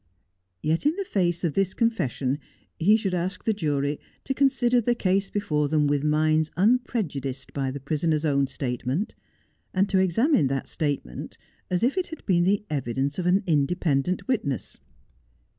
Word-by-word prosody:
Yet 160 Hz, -, +1 dB
in 310 Hz, -, +2 dB
the 395 Hz, 0 st, -3 dB
face 175 Hz, -, 0 dB
of 165 Hz, -4 st, 0 dB
this 195 Hz, -1 st, 0 dB
confession 145 Hz, -, 0 dB, 0.4 s
he 205 Hz, +7 st, +5 dB
should 195 Hz, -4 st, -2 dB
ask 180 Hz, +2 st, -2 dB
the 220 Hz, -, +2 dB
jury 145 Hz, -6 st, -1 dB, 0.2 s
to 270 Hz, -, -1 dB
consider 250 Hz, -3 st, +3 dB
the 240 Hz, +2 st, +1 dB
case 195 Hz, -2 st, +1 dB
before 150 Hz, -8 st, 0 dB
them 150 Hz, -1 st, +2 dB
with 145 Hz, 0 st, +1 dB
minds 155 Hz, +1 st, +2 dB
unprejudiced 180 Hz, -, 0 dB
by 135 Hz, -2 st, -1 dB
the 140 Hz, +2 st, -5 dB
prisoner's 155 Hz, +3 st, 0 dB
own 140 Hz, -2 st, +2 dB
statement, 130 Hz, -, -3 dB, 0.6 s
and 195 Hz, +2 st, +3 dB
to 190 Hz, -, +3 dB
examine 190 Hz, -, +3 dB
that 135 Hz, 0 st, -2 dB
statement 140 Hz, -, -4 dB, 0.3 s
as 180 Hz, +2 st, 0 dB
if 275 Hz, +10 st, +2 dB
it 365 Hz, -, -2 dB
had 320 Hz, -, -10 dB
been 175 Hz, -3 st, +3 dB
the 200 Hz, +2 st, +1 dB
evidence 140 Hz, -, -2 dB
of 175 Hz, -, -1 dB
an 190 Hz, +4 st, +3 dB
independent 155 Hz, +1 st, +1 dB
witness. 140 Hz, -, -2 dB
170 Hz, 160 wpm, -25 LUFS, 145-205 Hz, 0.6 s, he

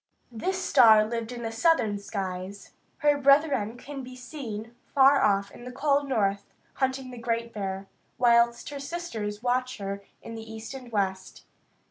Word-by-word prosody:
This 370 Hz, +12 st, -2 dB
star 225 Hz, -, +6 dB
lived 230 Hz, +1 st, -4 dB
in 240 Hz, -1 st, -6 dB
the 225 Hz, -, -3 dB
southern 225 Hz, -5 st, +2 dB
skies. 195 Hz, -1 st, -5 dB, 0.3 s
Her 290 Hz, -1 st, +4 dB
brethren 275 Hz, -5 st, +3 dB
can 275 Hz, +2 st, -8 dB
be 255 Hz, 0 st, -9 dB
seen 240 Hz, -4 st, -7 dB, 0.2 s
far 275 Hz, 0 st, +6 dB
off 200 Hz, -1 st, +2 dB
in -, -, -12 dB
the 250 Hz, -, -7 dB
cold 280 Hz, +1 st, +1 dB
north, 200 Hz, -5 st, 0 dB, 0.3 s
hunting 265 Hz, -1 st, -2 dB
the 245 Hz, -, -9 dB
Great 230 Hz, 0 st, -2 dB
Bear, 195 Hz, -1 st, -4 dB, 0.3 s
whilst 235 Hz, -1 st, +3 dB
her 285 Hz, -1 st, -6 dB
sisters 235 Hz, -10 st, -5 dB
watch 255 Hz, +1 st, 0 dB
her 200 Hz, -1 st, -5 dB, 0.2 s
in 230 Hz, -, -8 dB
the 225 Hz, 0 st, -8 dB
east 220 Hz, +3 st, -7 dB
and 255 Hz, -3 st, -9 dB
west. 190 Hz, -3 st, -2 dB
235 Hz, 160 wpm, -27 LUFS, 210-270 Hz, 0.3 s, star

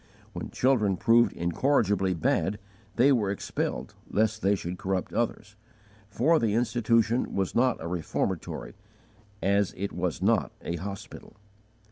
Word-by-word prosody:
When -, -, -5 dB
children 110 Hz, -8 st, +2 dB
proved 115 Hz, +5 st, +4 dB
incorrigibly 95 Hz, -, +1 dB
bad, 95 Hz, +5 st, 0 dB, 0.4 s
they 130 Hz, +4 st, +5 dB
were 110 Hz, -7 st, +2 dB
expelled, 100 Hz, -, -3 dB, 0.2 s
lest 110 Hz, +1 st, +1 dB
they 100 Hz, +1 st, +3 dB
should 90 Hz, -1 st, -5 dB
corrupt 95 Hz, -1 st, -2 dB
others, 110 Hz, -2 st, -2 dB, 0.5 s
for 150 Hz, +11 st, +3 dB
the 110 Hz, -2 st, +1 dB
institution 115 Hz, 0 st, +1 dB
was 95 Hz, -2 st, -1 dB
not 125 Hz, +1 st, +2 dB
a 80 Hz, -, -5 dB
reformatory, 85 Hz, -2 st, -3 dB, 0.7 s
as 100 Hz, 0 st, +2 dB
it 100 Hz, +2 st, -3 dB
was 85 Hz, -6 st, -2 dB
not -, -, +2 dB
a 85 Hz, -, -3 dB
_hospital. 95 Hz, +4 st, -8 dB
105 Hz, 130 wpm, -27 LUFS, 95-115 Hz, 0.7 s, they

